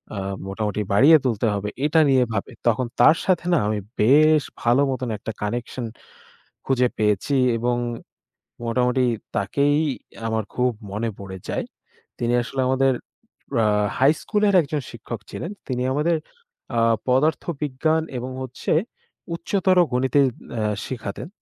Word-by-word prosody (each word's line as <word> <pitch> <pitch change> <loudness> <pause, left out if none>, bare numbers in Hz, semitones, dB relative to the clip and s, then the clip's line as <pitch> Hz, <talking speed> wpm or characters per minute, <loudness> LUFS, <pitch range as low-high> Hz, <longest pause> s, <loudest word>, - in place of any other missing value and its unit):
আ - - -5 0.3
মোটামুটি 105 +1 -2
বাড়িয়ে 145 +10 +7
তুলতে 115 -2 +1
হবে? 100 +1 -2 0.2
এটা 160 +2 +3
নিয়ে 130 -2 +5
ভাবে। 110 +5 -3 0.2
তখন 120 +2 +2
তার 160 - +7
সাথে 180 -2 +1
না, - - +5
আমি 105 -1 0 0.2
বেশ 150 +5 +5 0.2
ভালো 120 +4 +3
মতন 130 -2 -3
একটা 110 +2 -5
connection 120 +3 -3 0.8
খুঁজে 125 -2 +3
পেয়েছি 105 +6 +1 0.2
এবং 120 +1 0 0.9
মোটামুটি 125 +2 +1 0.3
তাকেই 140 +9 +2 0.5
আমার 110 -1 -1
খুব 125 0 +2 0.2
মনে 110 +3 -1
পড়ে 95 -1 -8
যায়। - - -2 0.5
তিনি 120 0 0
আসলে 130 +2 -4
আমাদের 135 0 +3 0.7
আ - - +3 0.3
হাইস্কুলের 195 +9 +2
একজন 145 0 -3
শিক্ষক 115 0 -7
ছিলেন। 170 - -5 0.2
তিনি 125 -1 -1
আমাদের 160 +4 +1 0.6
আ - - +4 0.3
পদার্থবিজ্ঞান 155 +2 +1 0.2
এবং 125 +2 -5
হচ্ছে 130 -1 -3 0.6
উচ্চতর 185 +1 +1
গণিতে 130 +3 +2 0.3
অ্যাঁ 105 -2 0
শিখাতেন। 120 +2 -5
130 Hz, 130 wpm, -23 LUFS, 115-145 Hz, 0.9 s, বাড়িয়ে